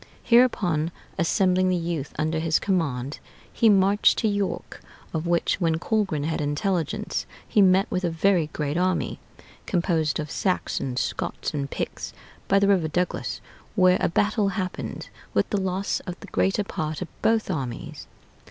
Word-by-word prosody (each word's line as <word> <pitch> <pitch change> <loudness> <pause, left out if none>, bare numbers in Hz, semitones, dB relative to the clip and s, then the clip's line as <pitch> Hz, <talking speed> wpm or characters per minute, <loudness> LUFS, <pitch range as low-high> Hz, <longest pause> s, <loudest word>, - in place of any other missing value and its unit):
Hereupon 190 -10 +3 0.3
assembling 185 +2 +3
the 185 - +2
youth 165 -4 -3
under 155 +1 0
his 160 -1 +2
command, 145 -8 -1 0.3
he 225 - +4
marched 200 0 +4
to 220 - +1
York, 205 -2 -2 0.3
of 160 +1 -2
which, 170 +2 +1
when 165 -2 +2
Colgrin 190 -5 0
had 160 0 -1
intelligence, 160 +4 -1 0.2
he 210 - +3
met 190 +1 +5
with 185 - -1
a 175 - +2
very 170 0 +2
great 150 0 -3
army, 185 +1 0 0.5
composed 170 -4 +1
of 150 -1 -4
Saxons, 135 -8 -1
Scots, - - -3
and 140 -2 -2
Picts, - - -4 0.3
by 195 - +4
the 200 0 +4
river 185 -5 +3
Duglas, 175 +3 -2 0.3
where 185 -2 +5
a - - +2
battle 205 +2 +2
happened, 185 -2 -4 0.3
with - - +3
the 205 - +1
loss 190 +1 -1
of 180 0 -5
the - - -10
greater 195 +3 +1
part 155 -3 -3
of 175 - -15
both 220 -3 +2
armies. 130 -8 -5
180 Hz, 155 wpm, -25 LUFS, 155-195 Hz, 0.5 s, met